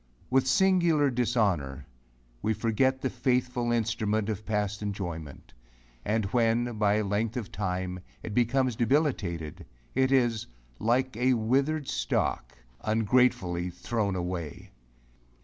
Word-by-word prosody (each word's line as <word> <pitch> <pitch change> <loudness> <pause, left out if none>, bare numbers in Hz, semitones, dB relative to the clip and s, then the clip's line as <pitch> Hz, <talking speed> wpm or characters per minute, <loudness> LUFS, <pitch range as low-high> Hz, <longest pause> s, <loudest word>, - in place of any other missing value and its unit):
With 130 0 +3
singular 170 -3 +3
dishonor, 100 - 0 0.6
we 110 0 0
forget 130 +4 +1
the 130 - 0
faithful 125 -2 0
instrument 110 -2 0
of 105 0 -4
past 105 -1 -1
enjoyment, 85 -8 -5 0.5
and 110 0 0
when, 120 -1 +1
by 105 0 +3
length 105 +4 -1
of 115 -5 -5
time, 90 -2 -3 0.2
it 105 - -5
becomes 125 +1 +2
debilitated, 110 - 0 0.3
it 130 0 +2
is, 120 -5 +2 0.3
like 125 +2 +1
a 125 +1 +3
withered 135 +6 +1
stalk, - - -1 0.3
ungratefully 110 -5 +2
thrown 100 +3 -2
away. 90 -4 -5
110 Hz, 115 wpm, -28 LUFS, 100-125 Hz, 0.6 s, With